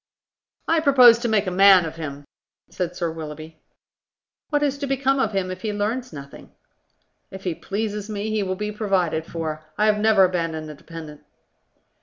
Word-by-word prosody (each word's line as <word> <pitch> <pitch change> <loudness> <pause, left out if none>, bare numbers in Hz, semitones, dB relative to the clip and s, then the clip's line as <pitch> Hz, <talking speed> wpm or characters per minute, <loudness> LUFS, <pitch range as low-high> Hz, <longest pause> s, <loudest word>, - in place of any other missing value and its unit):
"I 330 0 +3
propose 255 -6 +7
to 240 - -2
make 215 -2 +2
a 185 - -2
man 190 -1 +6
of 160 0 -7
him," 145 -3 -7 0.5
said 180 -1 -3
Sir 170 -2 -2
Willoughby. 155 0 -9 0.9
"What 295 -1 +1
is 280 -1 0
to 280 - -3
become 270 0 +1
of 220 -5 0
him 190 -1 -1
if 185 0 -7
he 215 - -2
learns 225 +5 -2
nothing?" 140 -1 -11 0.8
"If 190 0 -10
he 180 - -1
pleases 210 +3 -4
me, 210 +1 -3
he 215 -1 0
will 185 -1 -2
be 210 +2 -4
provided 185 -6 -1
for. 155 -2 -5
I 210 - +3
have 210 -1 +3
never 215 -2 +5
abandoned 165 -4 -3
a - - -8
dependent." 155 0 -11
195 Hz, 180 wpm, -23 LUFS, 165-220 Hz, 0.9 s, propose